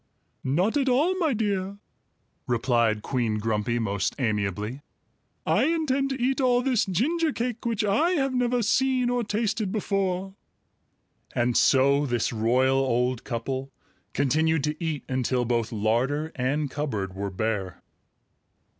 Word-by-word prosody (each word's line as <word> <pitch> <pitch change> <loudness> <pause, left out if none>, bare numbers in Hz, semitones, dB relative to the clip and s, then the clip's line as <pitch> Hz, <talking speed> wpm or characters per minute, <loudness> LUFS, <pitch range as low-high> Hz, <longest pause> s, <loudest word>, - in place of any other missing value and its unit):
"Not 180 - +1
at 270 -2 +1
all, 300 +9 +3
my 320 -5 +2
dear!" 200 -4 -1 0.7
replied 115 -3 +1
Queen 120 -5 -1
Grumpy 110 +2 -1
most 100 -4 -1
amiably. 105 +1 -2 0.6
"I - - +3
intend 290 -4 +1
to 265 -1 -3
eat 265 +3 +1
all 250 -1 +3
this 250 -5 +2
ginger 310 - +1
cake 240 -2 -3
which 225 -2 0
I 270 - +2
have 270 -5 0
never 245 -1 +1
seen 255 +2 +2
or 245 -1 0
tasted 215 -1 -1
before." 195 -2 -1 1.0
And 120 0 +1
so 140 +2 +4
this 120 -1 0
royal 130 +4 +2
old 125 -2 0
couple 130 +2 -4 0.4
continued 155 +3 +1
to 150 +2 -2
eat 155 -3 -2
until 130 -1 0
both 115 -1 0
larder 120 +8 0
and 135 +3 -1
cupboard 110 -11 -3
were 100 +1 -4
bare. 95 -2 -3
145 Hz, 135 wpm, -26 LUFS, -, 1.0 s, so